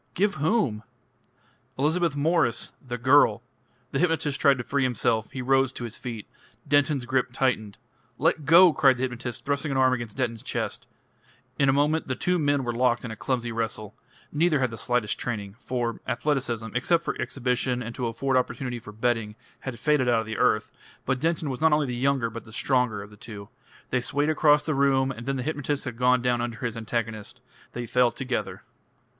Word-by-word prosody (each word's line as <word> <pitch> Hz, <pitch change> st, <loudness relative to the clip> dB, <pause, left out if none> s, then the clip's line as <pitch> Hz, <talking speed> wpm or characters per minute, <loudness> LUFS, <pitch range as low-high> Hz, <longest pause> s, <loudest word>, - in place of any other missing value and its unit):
"Give 200 Hz, +2 st, +2 dB
whom?" 145 Hz, -, +1 dB, 1.0 s
"Elizabeth 160 Hz, +3 st, +1 dB
Mwres 145 Hz, -5 st, +1 dB
the 120 Hz, -2 st, -5 dB
girl 125 Hz, -3 st, +4 dB, 0.2 s
" 125 Hz, +1 st, -39 dB
The 135 Hz, -, -1 dB
hypnotist 160 Hz, -5 st, 0 dB
tried 140 Hz, -2 st, +5 dB
to 120 Hz, -, -4 dB
free 140 Hz, +3 st, -1 dB
himself; 120 Hz, -3 st, 0 dB
he 130 Hz, -, -5 dB
rose 135 Hz, 0 st, +3 dB
to 120 Hz, -, -6 dB
his 115 Hz, -2 st, -5 dB
feet. 115 Hz, -4 st, -6 dB, 0.4 s
Denton's 145 Hz, -2 st, +2 dB
grip 130 Hz, 0 st, 0 dB
tightened. 120 Hz, -6 st, -1 dB, 0.4 s
"Let 155 Hz, +1 st, +1 dB
go!" 170 Hz, +3 st, +7 dB
cried 135 Hz, -3 st, +4 dB
the 125 Hz, -, -3 dB
hypnotist, 120 Hz, -2 st, -4 dB
thrusting 140 Hz, +2 st, -1 dB
an 135 Hz, -, 0 dB
arm 130 Hz, -1 st, +4 dB
against 120 Hz, -3 st, -5 dB
Denton's 115 Hz, -4 st, -1 dB
chest. -, -, -4 dB, 0.7 s
In 140 Hz, -1 st, +4 dB
a -, -, +4 dB
moment 150 Hz, +3 st, +1 dB
the 130 Hz, -, -1 dB
two 180 Hz, +5 st, 0 dB
men 145 Hz, -2 st, +1 dB
were 120 Hz, -1 st, -2 dB
locked 120 Hz, 0 st, +1 dB
in 115 Hz, -, -5 dB
a -, -, -6 dB
clumsy 120 Hz, 0 st, -2 dB
wrestle. 110 Hz, -2 st, -3 dB, 0.4 s
Neither 155 Hz, 0 st, +2 dB
had 130 Hz, -3 st, 0 dB
the -, -, -6 dB
slightest 120 Hz, -3 st, 0 dB
training 105 Hz, -5 st, -4 dB
for 120 Hz, -3 st, -3 dB
athleticism, 120 Hz, -3 st, -1 dB
except 165 Hz, +7 st, +1 dB
for -, -, -2 dB
exhibition 125 Hz, -1 st, -1 dB
and 115 Hz, 0 st, -6 dB
to 125 Hz, -2 st, -2 dB
afford 130 Hz, +3 st, 0 dB
opportunity 125 Hz, -1 st, -2 dB
for 105 Hz, -, -11 dB
betting, 110 Hz, -1 st, -1 dB, 0.2 s
had 130 Hz, -3 st, -6 dB
faded 150 Hz, -3 st, +2 dB
out 115 Hz, -2 st, +3 dB
of -, -, -7 dB
the 110 Hz, 0 st, -5 dB
earth -, -, +2 dB, 0.3 s
but 135 Hz, -1 st, 0 dB
Denton 165 Hz, 0 st, 0 dB
was 130 Hz, -, -6 dB
not 160 Hz, -1 st, +5 dB
only 150 Hz, -1 st, +3 dB
the 125 Hz, -2 st, -3 dB
younger 130 Hz, -2 st, +1 dB
but 115 Hz, 0 st, -7 dB
the 110 Hz, -, -15 dB
stronger 125 Hz, -3 st, 0 dB
of 100 Hz, -, -13 dB
the 105 Hz, -, -15 dB
two. 105 Hz, -2 st, -10 dB, 0.4 s
They 125 Hz, -, +1 dB
swayed 145 Hz, +4 st, 0 dB
across 150 Hz, -1 st, +4 dB
the 155 Hz, -, 0 dB
room, 135 Hz, -1 st, +2 dB
and 120 Hz, -1 st, -8 dB
then 135 Hz, -, 0 dB
the 130 Hz, -, -3 dB
hypnotist 145 Hz, -1 st, -2 dB
had 125 Hz, -3 st, -4 dB
gone 125 Hz, 0 st, +3 dB
down 120 Hz, -1 st, +1 dB
under 120 Hz, -1 st, -3 dB
his 115 Hz, -, -2 dB
antagonist. 115 Hz, -1 st, -4 dB, 0.3 s
They 120 Hz, 0 st, -4 dB
fell 125 Hz, +1 st, +3 dB
together.... 125 Hz, +1 st, -4 dB
125 Hz, 200 wpm, -26 LUFS, 115-140 Hz, 1.0 s, go